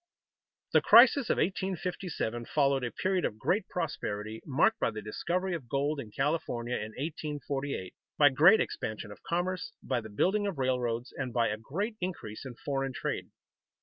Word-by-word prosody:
The - - +6
crisis 245 +2 +7
of - - +2
1857 180 - -2
followed 140 -2 +2
a 120 - -1
period 185 +7 0
of 105 - -1
great - - 0
prosperity 105 +2 -3
marked 155 +11 +3
by - - +2
the 110 -1 -5
discovery 175 - -2
of 140 -9 -5
gold 140 +3 0
in 120 -6 -6
California 125 -2 -1
in 105 - -3
1848, 145 - -4 0.2
by 145 -1 +7
great 160 +11 +6
expansion 110 -1 -3
of 105 - -12
commerce, 185 +5 -2
by 125 -3 -1
the 110 - -9
building 195 - +1
of 190 -6 -3
railroads, 125 -2 -1
and 130 -2 -3
by 120 -1 +2
a 105 - -2
great 200 - -3
increase 140 - -5
in 125 - -8
foreign 135 -2 -1
trade. - - -3
140 Hz, 165 wpm, -30 LUFS, 120-180 Hz, 0.2 s, crisis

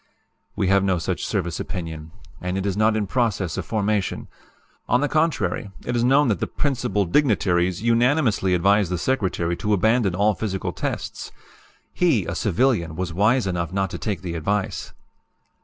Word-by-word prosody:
"We 95 - 0
have 100 0 +4
no 95 -2 +2
such 80 - -3
service 85 -3 -2
opinion, 80 -3 -5 0.3
and 90 +1 -2
it 95 - -2
is 100 -2 0
not 110 +1 +3
in 105 - 0
process 100 - -1
of - - -4
formation. 105 -3 -1 0.6
On 125 - +4
the 145 - +1
contrary, 145 - 0 0.2
it 120 - -2
is 120 - +1
known 135 +3 +4
that 100 -6 0
the - - -1
'Principal 105 -8 -1
Dignitaries' 95 - +1
unanimously 115 - +2
advised 100 +1 +3
the 90 - 0
Secretary 90 -6 0
to 105 - 0
abandon 110 -1 +2
all 105 +3 +3
physical 95 0 -3
tests. - - -4 0.6
He, - - +2
a - - -3
civilian, 85 -8 +1
was 90 -1 -3
wise 110 +7 +3
enough 85 -2 -2
not 95 -1 -1
to - - -5
take 100 -6 -3
the 85 -2 -4
advice. 100 +5 -2
100 Hz, 170 wpm, -23 LUFS, 90-115 Hz, 0.6 s, have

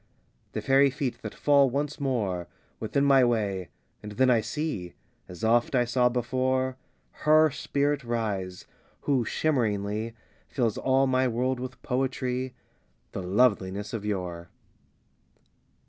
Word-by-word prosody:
XII - - -40
The - - -2
faery 135 +1 +5
feet 130 -3 -3
that - - -7
fall 140 -2 +4
once 145 +4 -2
more 105 -11 -1 0.3
Within 140 +6 0
my 135 -2 +6
way; 100 -7 0 0.3
and 105 0 -8
then 130 +3 +3
I 115 -2 +4
see, 110 - -4 0.3
As 90 +2 -10
oft 120 +4 +3
I 120 -1 +3
saw 125 +1 +2
before, 130 +1 0 0.5
Her 155 0 +5
Spirit 145 +1 -1
rise, 105 -6 -3 0.4
who 135 -4 +1
shimmeringly 110 -6 -1 0.3
Fills 120 -5 -1
all 135 +1 +3
my 130 0 +2
world 125 +2 0
with 130 +1 -6
poetry, 130 0 -2 0.6
The - - -4
Loveliness 100 0 +1
of 110 -3 -3
Yore. 90 -5 -4
125 Hz, 130 wpm, -27 LUFS, 105-135 Hz, 0.6 s, my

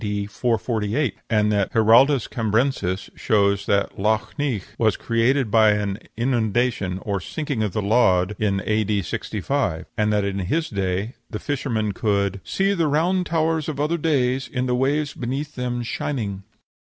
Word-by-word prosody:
D. 105 -1 -2
448; 115 +3 -1 0.2
and 105 -1 +2
Giraldus 115 +6 +4
Cambrensis 110 -4 -1
shows 100 -3 +1
that 100 -1 0
Lough 110 +2 +1
Neagh 135 -10 -1 0.2
was 110 -3 +2
created 115 +1 +1
by 110 -1 +5
an 105 -1 -2 0.2
inundation, 115 -5 0
or 100 -2 -1
sinking 145 - -3
of 105 -4 -1
the 110 - -1
land, 100 -3 +3
in 100 -2 0
A.D. 105 -2 +1
65, 110 - -2
and 105 -2 +1
that 105 -1 +1
in 100 0 -2
his 155 - -1
day 95 +3 -2 0.2
the 105 - -4
fishermen 115 -5 -2
could 100 -1 0
"See 195 +1 +1
the 170 -5 +1
round 175 +5 +1
towers 160 -1 0
of 145 -3 -5
other 155 +3 0
days 135 -4 +1
In 125 -1 -2
the 125 - 0
waves 140 +4 0
beneath 135 +5 -4
them 125 -1 -3
shining." 110 -5 -3
110 Hz, 150 wpm, -23 LUFS, 100-135 Hz, 0.2 s, by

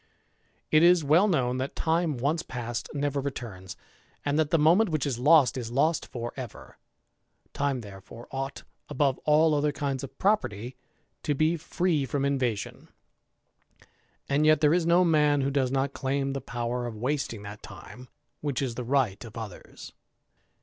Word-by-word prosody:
It 155 - +6
is 175 -1 +5
well 160 +8 +4
known, 130 -9 +1
that 130 +2 -4
time 160 -3 0
once 145 +7 0
past 120 -1 -5
never 145 -1 -1
returns; 115 -9 -6 0.5
and 145 +1 +1
hat 155 -2 +2
the 165 - +3
moment 170 +8 +4
which 155 -3 -1
is 130 -4 -2
lost 145 -1 +5
is 115 -2 -5
lost 150 +6 +1
for 120 -1 -6
ever. 125 -4 -9 0.7
Time 140 -3 -1
there 100 -3 -11
ore 120 - -11
ought, 135 +1 -5 0.3
above 140 -2 +1
all 155 +1 +4
other 150 0 +1
kinds 140 -2 -3
of 135 0 -9
property, 130 - 0 0.5
to 145 - -1
be 155 +4 +2
free 160 -2 -1
rom 140 -1 0
invasion; 125 -7 -2 1.4
and 140 +2 +2
yet 155 0 +5
there 150 0 +4
is 170 -1 +1
no 175 +2 +5
man 150 -3 +3
who 135 +1 0
does 135 -2 +1
not 135 +1 -1
claim 135 0 -1
lie 135 - -2
power 120 -1 -3
of 115 -2 -7
wasting 125 -3 -2
that 105 +1 -9
time 105 +6 -12 0.3
which 145 -4 -2
is 130 -4 -2
the 125 - -5
right 120 -6 0
of 115 -1 -11
others. 110 -4 -9
140 Hz, 170 wpm, -27 LUFS, 125-155 Hz, 1.4 s, It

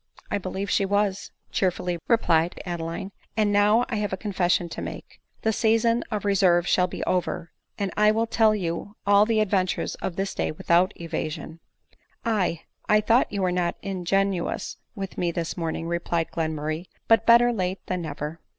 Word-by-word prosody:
" - - -23
I 205 - +1
believe 190 +1 -4
she - - +3
was," 200 0 0 0.2
cheerfully 180 -2 0
replied 175 -8 +2
Adeline, 175 +2 -4
" - - -39
and 210 -1 +3
now 210 +4 +4
I 230 - -2
have 210 -1 -1
a 190 - -2
confession 180 -3 0
to - - -6
make; - - -8 0.2
the 220 - +2
season 230 +2 +2
of 210 -2 -3
reserve 185 -3 +3
shall 180 0 +3
be'over, 175 -2 -2 0.3
and 195 -3 -2
1 210 0 +4
will 225 +1 +2
tell 220 -1 +3
you 185 +2 -4
all 205 +1 +5
the 225 -2 +2
adventures 190 -3 0
of 175 - -3
this 195 +1 -2
day - - -1
without 170 +4 +2
evasion" 160 -1 -5 0.4
" - - -44 0.2
Aye, 190 -7 0 0.3
I 210 - +6
thought 225 +4 +3
you 200 -2 -1
were 180 - +2
not 175 -1 0
ingenuous 195 -1 -1 0.2
with 195 -2 -6
me 175 - +1
this 170 -1 -3
morning," 165 -1 -3
replied 170 -1 -1
Glenmurray; 155 +1 -2 0.2
"but 225 -1 +4
better 240 +1 +6
late 185 -2 -2
than 180 -1 -2
never. 155 0 -5
190 Hz, 180 wpm, -25 LUFS, 170-210 Hz, 0.4 s, I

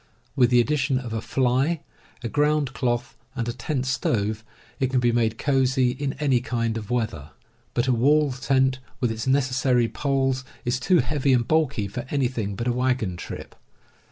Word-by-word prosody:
With 125 -2 +4
the 125 -1 +5
addition 135 +1 +1
of 125 -3 -5
a 110 - -2
fly, 135 +7 +1 0.4
a - - -1
ground 150 0 +1
cloth, 120 -2 -1 0.2
and 120 -2 -2
a 120 - -2
tent 135 0 -2
stove, 110 -5 -1 0.4
it 130 - +1
can 130 -1 +2
be 120 -1 +3
made 115 -1 +1
cosy 130 -2 +2
in 135 +1 -3
any 135 -3 +1
kind 115 -2 -1
of 105 -2 -6
weather. 110 - -2 0.5
But 120 - +2
a 130 - +3
wall 145 +4 +3
tent, 130 0 +1 0.2
with 120 -3 +1
its 110 +2 -4
necessary 130 -2 +2
poles, 135 0 0 0.2
is 125 +1 0
too 175 +6 +3
heavy 140 -3 +1
and 120 -2 +2
bulky 155 -10 +1
for 120 +5 -6
anything 120 -8 -1
but 120 - -4
a 125 - +1
wagon 125 -6 0
trip. - - -8
125 Hz, 180 wpm, -24 LUFS, 120-135 Hz, 0.5 s, the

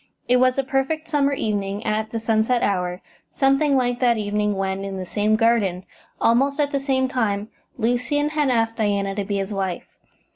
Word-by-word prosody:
It 250 - +4
was 255 +1 +3
a 275 - +2
perfect 270 +4 -1
summer 285 -3 +1
evening, 205 -4 -2
at 215 0 -1
the 230 - -3
sunset 225 +2 +1
hour, 180 -2 -1 0.3
something 275 +1 +2
like 245 -1 0
that 240 -2 +3
evening 210 0 -1
when, 195 0 -2
in 195 -1 -5
the 185 - -5
same 210 +3 +1
garden, 215 -5 +1 0.3
almost 275 +5 +2
at 290 -1 +1
the 280 - 0
same 265 -1 0
time, 220 -5 -1 0.3
Lucian 250 +5 0
had 300 -2 0
asked 225 -2 +1
Diana 200 -3 0
to 200 0 -2
be 200 0 -2
his 195 +1 -3
wife. 190 -3 -3
225 Hz, 185 wpm, -22 LUFS, 200-265 Hz, 0.3 s, It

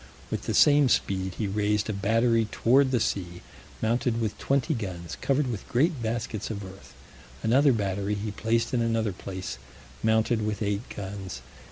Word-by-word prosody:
With - - -3
the - - 0
same 145 -2 +6
speed 95 -4 0
he 110 - -2
raised 105 +1 0
a 110 - -1
battery 115 +3 +2
toward 130 +3 +4
the 125 -2 +2
sea, 90 -5 -2 0.4
mounted 115 +1 +1
with 110 -3 -1
twenty 140 +3 +1
guns, 95 - -5
covered 140 +1 +2
with 115 -6 -4
great 140 +2 +2
baskets 110 -2 -3
of 100 -3 -5
earth: 95 +1 -13 0.5
another 135 +5 +5
battery 100 -2 -1
he 105 +1 -3
placed 115 +4 0
in 120 - +2
another 115 -3 0
place, 95 0 -6 0.4
mounted 110 0 +2
with 105 0 -2
eight 100 +3 -2
guns. 95 -9 -6
110 Hz, 165 wpm, -27 LUFS, 100-120 Hz, 0.5 s, same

